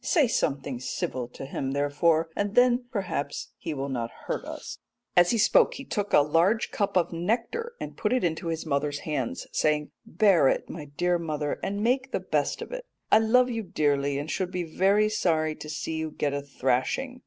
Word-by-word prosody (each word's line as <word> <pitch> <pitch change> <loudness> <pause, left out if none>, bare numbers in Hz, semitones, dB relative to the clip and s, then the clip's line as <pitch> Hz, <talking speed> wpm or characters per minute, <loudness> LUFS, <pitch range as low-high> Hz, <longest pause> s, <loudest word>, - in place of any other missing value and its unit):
Say 310 -8 +3
something 140 - -1
civil 125 -1 -3
to 125 - -9
him, 135 0 -3
therefore, 155 +3 +2
and 205 0 -2
then 245 0 +4
perhaps 185 -10 -3
he - - -4
will 135 0 -3
not 120 -4 -3 0.2
hurt - - -2
us.' - - -7 0.4
"As 175 0 +6
he 235 - +2
spoke 215 - +4
he 270 - -8
took 205 -1 -2
a - - +7
large 170 +9 +2
cup 200 -2 0
of 175 -1 +1
nectar 235 - -2
and - - -6
put 210 - -1
it 255 -4 +2
into 165 -1 -1
his 165 0 -3
mother's 145 -1 -1
hands, 130 - -3
saying, 150 -1 +1
'Bear 180 -5 +4
it, - - +1
my 155 -3 -7
dear 175 +5 0
mother, 150 -3 -2
and 200 +1 -2
make 260 +3 +1
the - - 0
best - - -1
of - - -11
it. - - -5 0.3
I 215 - +8
love 250 +3 +4
you 230 -1 -2
dearly 145 -6 0
and 145 +2 -4
should 185 -2 -1
be 180 -1 -2
very 195 +6 +3
sorry 160 -7 +1
to 150 - -8
see 160 +1 -3
you 160 0 -2
get 145 -1 -2
a 140 - -2
thrashing. 140 - -1
165 Hz, 200 wpm, -27 LUFS, 145-215 Hz, 0.4 s, I